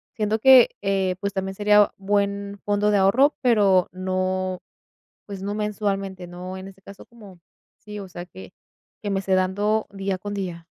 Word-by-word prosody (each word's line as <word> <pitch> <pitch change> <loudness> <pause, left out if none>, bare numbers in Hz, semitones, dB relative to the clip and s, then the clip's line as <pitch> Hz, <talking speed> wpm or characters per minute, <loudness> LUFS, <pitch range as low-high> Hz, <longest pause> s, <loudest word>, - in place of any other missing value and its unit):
siento 215 0 -1
que, 260 +1 +7
eh, 195 -2 0
pues 200 0 -2
también 190 -1 -3
sería 210 0 +4
buen 200 0 -1
fondo 205 0 +1
de 205 - +3
ahorro, 235 +10 +4
pero 205 -7 +3
no, 185 0 -2 0.7
pues, 200 -2 -7
no 205 +1 -3
mensualmente, 195 -3 -3
no, 180 +1 -8
en 190 +1 -8
este 195 0 -18
caso 200 0 -13
como, 205 -6 -15 0.4
sí, 210 -1 -9
o 195 - -8
sea 175 0 -8
que 185 +1 -13 0.5
que 210 - -4
me 195 -1 0
esté 195 -1 -1
dando 205 +4 0
día 195 -1 -3
con 205 +2 -6
día. 175 -4 -5
195 Hz, 170 wpm, -23 LUFS, 185-210 Hz, 0.7 s, que